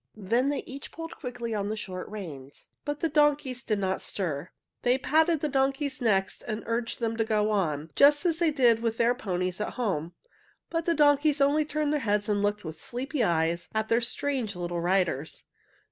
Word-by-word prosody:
Then 230 +7 +1
they 290 - -2
each 275 +1 -8
pulled 330 0 -7
quickly 245 -4 -5
on 205 -1 -1
the 215 - -1
short 185 -3 -5
reins, 150 -10 -9 0.2
but 290 0 -3
the 330 - +2
donkeys 295 -5 +2
did 215 - 0
not 190 -1 -1
stir. 170 -4 -3 0.3
They 245 +1 +3
patted 315 +3 +2
the 305 - +1
donkeys' 270 0 0
necks 195 -5 +1
and 215 -1 -4
urged 230 0 -2
them 230 -1 -1
to 225 - +2
go 215 -1 +1
on, 160 -6 -1
just 290 +4 +6
as 335 -2 +1
they 340 -2 +3
did 245 -6 +4
with 230 -1 -1
their 235 +1 +3
ponies 185 -5 -2
at - - -3
home, 180 -9 -2 0.6
but 330 -1 -1
the 335 - +3
donkeys 290 0 +4
only 290 +2 +3
turned 300 0 -1
their 300 - +1
heads 210 -3 0
and 205 -1 +1
looked 205 0 0
with 160 -1 -7
sleepy 260 +2 -2
eyes 170 -2 +1
at 220 0 0
their 230 +1 +3
strange 250 -3 -2
little 175 -1 -3
riders. 170 -5 0
230 Hz, 195 wpm, -28 LUFS, 195-285 Hz, 0.6 s, just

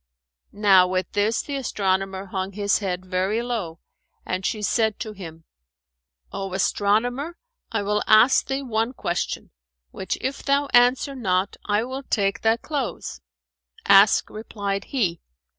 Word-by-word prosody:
"[FN#426] 205 - -16
Now 190 -3 +6
with 185 -1 -2
this, 210 +2 +1
the 285 - -5
astronomer 195 -5 -1
hung 190 0 -4
his 205 +1 +1
head 185 -3 -3
very 190 +5 -1
low, 205 -9 -4 0.4
and 185 +1 -3
she 210 +2 -2
said 220 +1 +1
to 220 - -4
him, 165 -5 -10 0.9
"O 195 -1 -4
astronomer, 245 - 0 0.3
I 225 -3 -1
will 210 +1 0
ask 220 +4 +5
thee 270 +1 -2
one 230 0 -1
question, 175 -8 -3 0.4
which 190 - -4
if 270 +1 -3
thou 280 0 +1
answer 245 +3 +4
not, 195 -6 -1
I 210 +1 +1
will 260 +2 -5
take 200 -7 -1
thy 225 +1 +3
clothes." 255 - -4 0.6
"Ask," 200 +1 +6
replied 200 -2 -4
he. 185 -11 -1
205 Hz, 140 wpm, -23 LUFS, 190-240 Hz, 0.9 s, Now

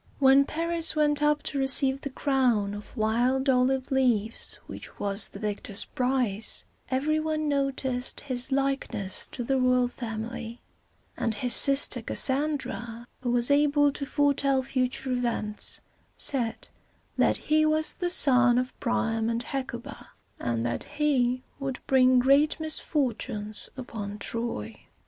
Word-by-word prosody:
When 270 0 +4
Paris 330 +1 -2
went 295 -1 +1
up 295 0 +1
to 280 - -3
receive 270 0 +3
the 280 - -5
crown 250 -7 0
of 205 +5 -11
wild 245 +5 0
olive 260 +1 +1
leaves 235 -5 0
which - - -10
was 200 0 0
the - - -11
victor's 205 -1 -3
prize, 245 -5 -1 0.3
every 295 +4 0
one 310 0 -2
noticed 270 -3 -2
his 255 -1 -4
likeness 270 -8 -1
to 245 - -6
the 265 +2 -1
royal 255 -1 +2
family; 230 0 -7 0.6
and 225 -2 -2
his 245 +3 +2
sister 275 -3 +9
Cas - - -2
san´dra, 260 -5 0 0.2
who 250 - -3
was 240 +2 +4
able 290 0 +3
to 280 - -6
foretell 280 -2 +1
future 260 0 -2
events, 235 -4 -1 0.4
said 240 -5 0 0.5
that - - +2
he 310 0 +1
was 310 0 0
the 355 - -3
son 250 -7 +5
of 255 0 -2
Priam 225 -2 -1
and 235 +1 -2
Hecuba, 255 -1 -7 0.3
and 115 -1 -3
that 120 - -3
he 255 -4 0 0.2
would 270 -1 -5
bring 255 -1 +3
great 275 +5 +3
misfortunes 250 -9 -3
upon 210 -5 -7
Troy. 205 - -5
255 Hz, 135 wpm, -26 LUFS, 235-280 Hz, 0.6 s, sister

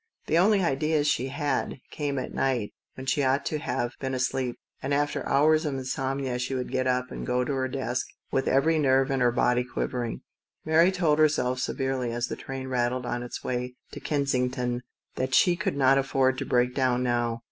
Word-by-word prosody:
The 165 - +2
only 200 +1 +4
ideas 155 0 +1
she 130 -2 +1
had 145 0 -1 0.2
came 145 -2 -2
at 130 - -4
night, 125 -6 0 0.2
when 130 - -8
she 145 +3 +1
ought 135 +1 +1
to 155 - -1
have 120 -3 -2
been 130 -1 -2
asleep, 130 -1 -1 0.3
and 140 +2 0
after 145 0 0
hours 155 +3 +4
of 145 -3 -2
insomnia 130 0 -2
she 125 +2 -2
would 125 -1 -3
get 130 0 0
up 125 0 0
and - - -6
go 125 0 +1
to 140 - -2
her 130 -1 0
desk 130 -2 -2 0.2
with 135 - 0
every 155 +4 +3
nerve 135 -1 +3
in 135 - +1
her 120 -1 +4
body 125 +1 +2
quivering. 125 -1 -3 0.4
Mary 165 +4 +5
told 165 -5 +2
herself 130 -5 +2
severely, 130 -2 -1
as 120 +1 -1
the - - -3
train 135 0 -6
rattled 125 0 0
on 120 0 -2
its 120 - -7
way 125 0 -3 0.2
to - - -7
Kensington, 125 -3 -1 0.4
that 130 +1 0
she 175 -2 +5
could 175 -6 -2
not 135 0 +5
afford 135 -1 +1
to - - -3
break 125 0 +2
down 125 -2 +1
now. 120 -1 0
130 Hz, 200 wpm, -27 LUFS, 125-140 Hz, 0.4 s, Mary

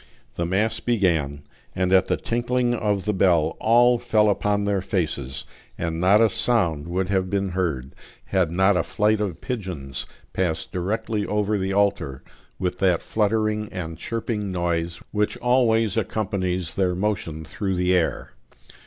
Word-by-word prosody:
The 85 - -2
mass 100 +5 +1
began; 80 -11 0 0.3
and 90 0 +1
at 95 0 +5
the - - +1
tinkling 120 +1 0
of 105 -5 -1
the 105 - +1
bell 85 -5 +3
all 120 +2 +4
fell 110 -3 +3
upon 100 0 0
their 100 -2 +1
faces, 75 - -2 0.3
and 85 -1 -2
not 95 +4 +5
a 115 - +6
sound 90 -8 +1
would 90 +2 -1
have 95 -2 0
been 100 0 0
heard, 80 -8 -2 0.3
had 95 -4 +1
not 95 +3 +3
a 90 - +3
flight 105 +4 +1
of 90 -6 -3
pigeons 90 - -4 0.3
passed 85 -4 -1
directly 105 +4 -2
over 105 0 0
the 95 -1 -1
altar 100 -10 0 0.3
with 90 0 -2
that 90 -4 +2
fluttering 110 0 0
and 80 -3 -5
chirping 110 -1 -3
noise 85 -1 -1
which 105 0 0
always 115 -4 +2
accompanies 95 -5 -1
their 90 -2 +1
motion 90 -6 -2
through 95 +3 -3
the 90 0 +2
air. 90 -3 0
95 Hz, 155 wpm, -24 LUFS, 85-105 Hz, 0.3 s, a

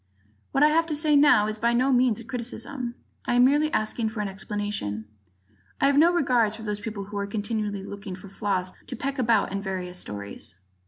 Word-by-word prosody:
What 275 - +3
I 300 - +7
have 330 +2 +2
to 310 - -1
say 300 0 +3
now 285 -7 +6
is 215 0 -3
by 235 +1 +2
no 255 +3 +3
means 245 -3 +3
a - - -8
criticism. 240 +1 -5 0.3
I 245 - +1
am 245 0 +6
merely 295 +3 +3
asking 220 +1 0
for 220 -1 -4
an 205 - -1
explanation. 195 - -4 0.7
I - - +3
have 280 0 +4
no 335 +3 +6
regard 250 -10 +2
for 220 - -9
those 210 -1 -2
people 210 -1 -5
who 205 +1 -7
are 200 - -2
continually 205 -1 -2
looking 200 -1 -7
for 190 +2 -11
flaws 190 -2 -2
to - - -5
peck 275 +3 -3
about 225 -6 +3
in 195 0 -2
various 180 -2 -4
stories. 100 - -6
220 Hz, 210 wpm, -26 LUFS, 200-255 Hz, 0.7 s, I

